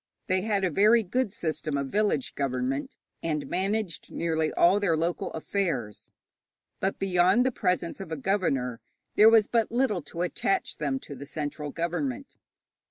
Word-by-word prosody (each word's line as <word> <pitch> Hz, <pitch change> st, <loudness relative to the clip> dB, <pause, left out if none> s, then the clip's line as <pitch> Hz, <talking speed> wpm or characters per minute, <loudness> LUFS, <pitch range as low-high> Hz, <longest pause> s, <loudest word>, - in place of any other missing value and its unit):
They 185 Hz, 0 st, +1 dB
had 205 Hz, -1 st, 0 dB
a 185 Hz, -, +1 dB
very 215 Hz, +7 st, +5 dB
good 230 Hz, +3 st, -1 dB
system 155 Hz, -7 st, -2 dB
of 140 Hz, -1 st, -2 dB
village 205 Hz, -9 st, 0 dB
government, 135 Hz, 0 st, -2 dB, 0.2 s
and 150 Hz, -4 st, -2 dB
managed 195 Hz, +1 st, -2 dB
nearly 160 Hz, -2 st, 0 dB
all 185 Hz, +4 st, +4 dB
their 175 Hz, -6 st, +2 dB
local 170 Hz, +2 st, -1 dB
affairs. 160 Hz, -, -3 dB, 0.7 s
But 195 Hz, -, -1 dB
beyond 190 Hz, +5 st, +3 dB
the 260 Hz, -, +2 dB
presence 180 Hz, -6 st, -1 dB
of 190 Hz, -4 st, -7 dB
a 160 Hz, -, -2 dB
governor, 135 Hz, -, 0 dB, 0.3 s
there 215 Hz, +2 st, +7 dB
was 225 Hz, -2 st, +6 dB
but 230 Hz, -1 st, +1 dB
little 235 Hz, -6 st, +1 dB
to 170 Hz, +4 st, -4 dB
attach 185 Hz, +2 st, -1 dB
them 145 Hz, -3 st, -1 dB
to -, -, -9 dB
the 140 Hz, +1 st, -9 dB
central 150 Hz, 0 st, -4 dB
government. 245 Hz, -, -3 dB
175 Hz, 160 wpm, -27 LUFS, 150-205 Hz, 0.7 s, there